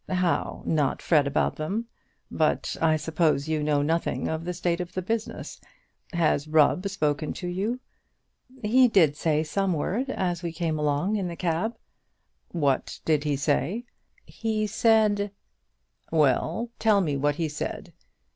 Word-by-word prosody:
"How, 180 -2 0
not 150 -4 +1
fret 150 -4 +3
about 140 - 0
them? 195 +10 -2 0.5
But - - 0
I 160 -1 +4
suppose 155 -2 +1
you 155 -1 0
know 150 -1 +2
nothing 165 +3 0
of 160 +1 -3
the 180 - -2
state 175 0 0
of 180 0 -7
the 185 - -3
business. 225 +3 -4 0.5
Has 160 -4 +1
Rubb 160 +5 +3
spoken 150 -5 -1
to 180 - -6
you?" 200 +8 -2 0.8
"He 250 +4 +5
did 165 -10 +4
say 155 -1 +1
some 190 +4 0
word 205 - -1
as 180 -8 -1
we 170 -2 -4
came 160 -2 -1
along 150 +8 +1
in 190 -3 -2
the 170 - -5
cab." 175 +7 -1 0.7
"What 145 -6 -1
did 155 -2 +2
he 145 -1 +1
say?" 150 - 0 0.4
"He 220 -1 -2
said 210 -1 +3 0.4
" - - -40
"Well, 160 - +1
tell 215 -3 +4
me 150 -6 0
what 145 +1 +1
he 165 0 -1
said. 150 0 -5
165 Hz, 155 wpm, -26 LUFS, 150-200 Hz, 0.8 s, He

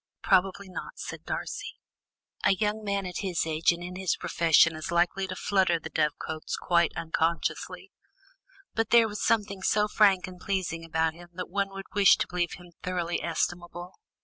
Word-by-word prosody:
"Probably 190 +1 +2
not," 185 - -7
said - - -7
Darcy, 410 0 -4 0.7
"a 195 - +4
young 210 +2 -1
man 200 -1 -1
at 180 -1 -4
his 185 -5 -1
age 160 +1 +2
and 170 0 -5
in 180 +1 -6
his 190 -2 0
profession 165 -1 +4
is 155 - -6
likely 175 +3 +1
to 185 - -5
flutter 185 -3 +2
the 160 0 -8
dovecotes 155 +1 -2
quite 170 -2 +2
unconsciously. 165 0 -2 0.8
But 225 -1 0
there 235 -1 +6
was 210 -1 -5
something 205 -3 +1
so 210 +2 +2
frank 200 -3 +4
and 185 -1 -10
pleasing 185 -4 -2
about 160 -1 0
him 175 +1 -14
that 180 0 -6
one 200 0 0
would 195 0 -8
wish 200 -2 +6
to - - 0
believe 175 -1 -1
him 175 -1 -12
thoroughly 175 -1 -2
estimable." 175 +1 -3
180 Hz, 175 wpm, -28 LUFS, 170-195 Hz, 0.8 s, there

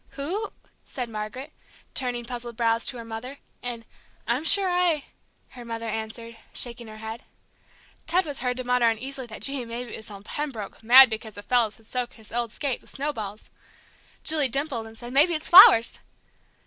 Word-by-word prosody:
"Who 375 +10 -3 0.2
?" - - -36
said 245 -3 -6
Margaret, 225 +7 -6 0.4
turning 245 -2 0
puzzled 240 -1 -7
brows 230 -1 +1
to 250 - -4
her 230 - -8
mother, 230 +5 -7 0.2
and 235 -2 -6 0.4
"I'm 245 +6 0
sure 395 +3 +5
I 355 -5 +1 0.2
" - - -41
her 250 -2 -11
mother 230 -1 -5
answered, 225 +1 -5 0.2
shaking 235 -1 -3
her 215 0 -10
head. 220 +2 -7 0.9
Ted 360 +3 +2
was 290 -3 -4
heard 250 0 -2
to 255 - -3
mutter 250 -1 +3
uneasily 260 +3 -4
that, 220 - -9
gee, 275 -2 +3
maybe 235 0 -7
it - - -5
was 220 0 -10
old 200 -1 -11
Pembroke, 240 -10 -5
mad 260 +4 +9
because 220 -1 -6
the 205 - -9
fellers 235 -3 +1
had 225 - -21
soaked 245 +1 -4
his 220 -2 -16
old 235 -1 -2
skate 275 +1 -2
with - - -16
snowballs; 220 -8 -5 0.7
Julie 305 -4 +2
dimpled 260 -3 -2
and 225 0 -14
said, 240 +2 -9
"Maybe 310 +5 +4
it's 310 - -5
flowers!" 290 -10 +9
240 Hz, 185 wpm, -25 LUFS, 225-275 Hz, 0.9 s, mad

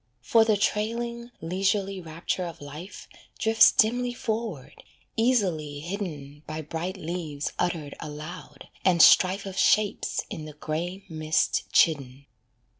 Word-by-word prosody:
For 225 -1 +5
the 220 -2 +2
trailing, 235 +3 -1
leisurely 195 +2 0
rapture 165 +2 -3
of 170 -2 -8
life 150 +6 -9 0.3
Drifts 225 0 +6
dimly 245 +2 +2
forward, 220 - -4 0.3
easily 185 - +1
hidden 155 -6 -6
By 155 +1 -4
bright 170 +5 -4
leaves 160 -4 -4
uttered 160 -5 -1
aloud, 155 +2 -9
and 180 -2 +3
strife 190 +3 +6
Of 190 -1 -4
shapes 210 -1 +2
in 155 - -6
the 155 - -9
grey 170 +6 -4
mist 155 -2 0
chidden. 140 -4 +2
175 Hz, 120 wpm, -26 LUFS, 155-210 Hz, 0.3 s, Drifts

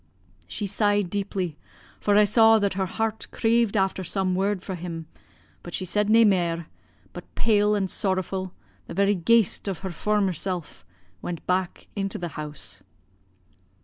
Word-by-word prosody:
"She 210 - -4
sighed 205 -2 +1
deeply, 190 -6 -2 0.4
for 205 - +2
I 210 - +7
saw 225 +2 +6
that 200 -2 +1
her 190 0 -1
heart 220 +2 -2
craved 230 -2 +2
after 190 -1 +1
some 185 +1 0
word 190 0 0
fra' 190 - -5
him, 170 -2 -6 0.6
but 175 - -6
she 185 - -3
said 210 +3 0
nae 225 +1 +7
mair, 170 -5 +2 0.5
but - - -11
pale 210 -2 +3
an' 200 -2 +1
sorrowfu', 190 -1 -1 0.4
the - - -7
very 200 +2 +3
ghaist 205 +2 +2
o' 195 - -2
her 190 +2 -6
former 200 +2 +1
sel', 180 0 -3 0.6
went 170 -2 -5
back 185 0 -1
into 195 -1 -2
the 175 -1 -4
house. 150 -1 -7
195 Hz, 155 wpm, -25 LUFS, 180-210 Hz, 0.6 s, I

